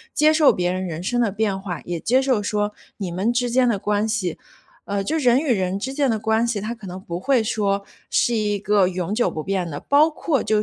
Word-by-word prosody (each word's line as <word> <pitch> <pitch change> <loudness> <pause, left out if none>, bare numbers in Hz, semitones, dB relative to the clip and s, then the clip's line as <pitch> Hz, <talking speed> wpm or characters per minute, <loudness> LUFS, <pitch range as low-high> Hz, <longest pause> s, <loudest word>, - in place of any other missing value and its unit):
接 310 +1 +5
受 310 -2 +6
别 180 0 -1
人 185 +1 -2
人 165 +1 -5
生 240 +6 0
的 225 -4 +1
变 205 -2 -1
化， 185 -3 -5
也 175 -1 -3
接 255 +9 +2
受 260 -5 +1
说 205 0 -1 0.2
你 190 -4 -4
们 195 +7 0
之 245 0 0
间 250 0 +3
的 220 - +1
关 205 +2 0
系。 190 -7 -1 0.5
呃， 200 -1 -2
就 315 +9 -1
人 250 -3 +4
与 285 -4 +1
人 190 -2 -1
之 265 +7 -4
间 280 -2 +1
的 225 - +1
关 220 +2 +1
系， 230 -3 -1
它 215 +4 -4
可 215 -5 -11
能 180 +1 -7
不 175 -2 -6
会 255 +2 +2
说 200 -2 -1 0.2
是 240 - +2
一 210 -2 0
个 200 -2 +2
永 185 +1 -3
久 240 +3 +2
不 155 - -5
变 190 -3 -2
的。 145 -2 -5
包 295 +3 +4
括 300 -4 -1
就 215 - +1
210 Hz, 265 characters per minute, -22 LUFS, 190-240 Hz, 0.5 s, 受